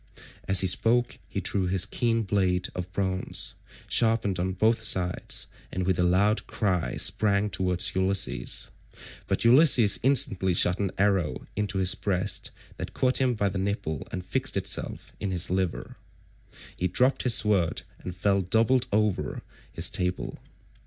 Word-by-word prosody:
As 95 -1 +5
he - - 0
spoke 120 +6 +1
he - - -4
drew 95 -2 -1
his 95 0 0
keen 115 +2 -1
blade 95 -3 0
of 90 0 -6
bronze, 95 -1 -3 0.3
sharpened 110 -5 +1
on 95 +1 -2
both 110 +5 +1
sides, 90 -1 0 0.3
and 90 0 -3
with 95 -1 0
a - - +3
loud 100 +5 +1
cry 95 -6 -2
sprang 105 0 +1
towards 90 -2 -1
Ulysses, 95 -9 +1 0.6
but - - -2
Ulysses 125 -4 +5
instantly 100 -9 +3
shot 90 +1 +3
an 100 -2 -1
arrow 95 -5 0
into 105 -1 -2
his 95 -1 +3
breast 95 0 -2 0.3
that - - -7
caught 130 +1 +1
him 125 -2 +1
by 105 -2 0
the 95 0 -3
nipple 95 -6 -3
and 90 -1 -6
fixed 130 +4 -2
itself 95 - -2
in 100 - -3
his 90 -2 +1
liver. 95 -2 -3 0.8
He 90 - -1
dropped 125 +8 +1
his 125 -3 +5
sword 100 -6 +1 0.2
and 90 - -8
fell 100 +1 +1
doubled 115 +7 +2
up - - 0
over 105 -10 -1 0.3
his - - +2
table. 90 0 -3
95 Hz, 155 wpm, -26 LUFS, 90-110 Hz, 0.8 s, As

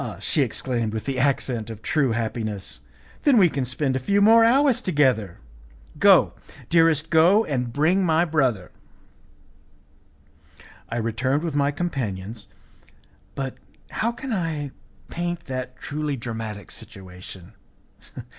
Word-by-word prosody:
she - - +1
exclaimed 120 -4 -2
with 110 - -4
the 135 -2 -2
accent 125 -4 0
of 110 -1 -9
true 145 -6 +1
happiness, 110 - -3 0.4
"then 280 -5 +4
we 190 -4 +7
can 140 -5 -2
spend 130 +2 -1
a - - 0
few 200 +10 +1
more 225 +3 +6
hours 265 +2 +4
together! 130 - +1 0.6
Go, - - +6 0.4
dearest, 165 -2 +3
go 175 +7 +5
and 125 -4 -2
bring 160 +8 +2
my 165 0 +3
brother." 130 - 0 2.2
I 115 - -4
returned 125 +6 -1
with 165 -3 -2
my 140 -1 +2
companions, 115 - -4 0.9
but 135 -2 -4 0.3
how 230 - 0
can 245 +1 -6
I 160 -7 -2 0.4
paint 175 0 -3
that 130 -1 -5
truly 150 -1 -3
dramatic 110 -4 -6
situation? 90 +1 -10
135 Hz, 125 wpm, -24 LUFS, 115-165 Hz, 2.2 s, we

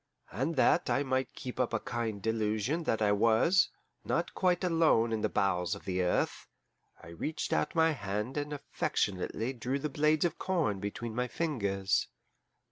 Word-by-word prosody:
And 135 - -1
that 165 +5 +3
I 140 - +2
might 130 -2 -1
keep 125 0 -7
up 125 -2 0
a - - +1
kind 110 -5 -3
delusion 110 +8 0
that 110 -5 +1
I 105 - +3
was 115 - +4 0.3
not - - -1
quite 180 -1 +1
alone 160 -10 +3
in 110 - -1
the - - +1
bowels 90 -3 +1
of - - -12
the 95 -1 -1
earth, 90 - 0 0.6
I - - -11
reached 115 - -3
out 150 - 0
my 165 0 +4
hand 105 -2 -3
and 145 0 -3
affectionately 115 -4 -2
drew 125 +2 -2
the 150 +2 -3
blades 150 +3 +2
of 175 - -2
corn 165 - 0
between 105 +3 -4
my 125 +2 -1
fingers. 100 -12 0
120 Hz, 170 wpm, -31 LUFS, 105-150 Hz, 0.6 s, was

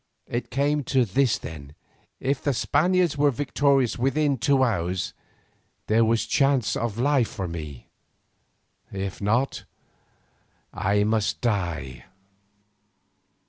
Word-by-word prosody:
It 120 +1 -4
came 145 +2 0
to 130 -2 +2
this 115 +3 +1
then, 75 -2 -9 0.4
if 135 +1 -1
the 140 -2 0
Spaniards 175 +3 +1
were 145 0 +5
victorious 140 -2 +1
within 140 +1 +1
two 135 +2 +3
hours, 90 -6 -1 0.7
there 110 +2 +3
was 115 0 +1
a - - -16
chance 135 -4 +2
of 115 -2 -3
life 130 -1 +2
for 95 -8 -5
me, 75 -6 -7 1.0
if 95 0 -5
not 115 +7 0 1.1
I 100 +2 +1
must 110 0 0
die. 85 - -2
120 Hz, 115 wpm, -25 LUFS, 95-140 Hz, 1.1 s, were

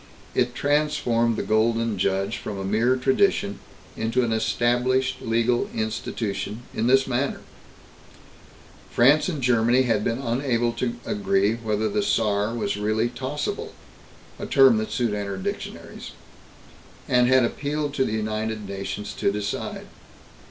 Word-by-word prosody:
It 125 0 0
transformed 145 -6 +1
the - - -1
Golden 115 0 +1
Judge 95 +4 0
from 105 -4 -6
a 95 - -4
mere 115 +6 +2
tradition 130 - +1 0.4
into 115 +3 0
an 115 - -1
established 125 +3 +1
legal 115 +2 +1
institution, 110 0 -3
in 115 - 0
this 135 +1 +5
manner: 130 +2 -1 1.5
France 145 +8 +4
and 150 -7 -4
Germany 120 +1 +3
had 110 -4 +1
been 115 +1 0
unable 120 -2 0
to 120 -1 -2
agree 195 - +1
whether 110 -2 -1
the 210 +1 0
Saar 105 - +1
was 105 -3 -2
really 110 +3 0
tossable 130 +4 -4 0.7
a - - -5
term 135 -4 +6
that 110 0 -2
soon 120 -4 0
entered 100 -2 -4
dictionaries - - -6 0.9
and 125 -1 +4
had 130 -1 +5
appealed 145 +3 -2
to 135 - +1
the 110 - -2
United 110 -1 -3
Nations 100 +1 -5
to - - 0
decide. 105 0 -4
115 Hz, 135 wpm, -24 LUFS, 110-130 Hz, 1.5 s, term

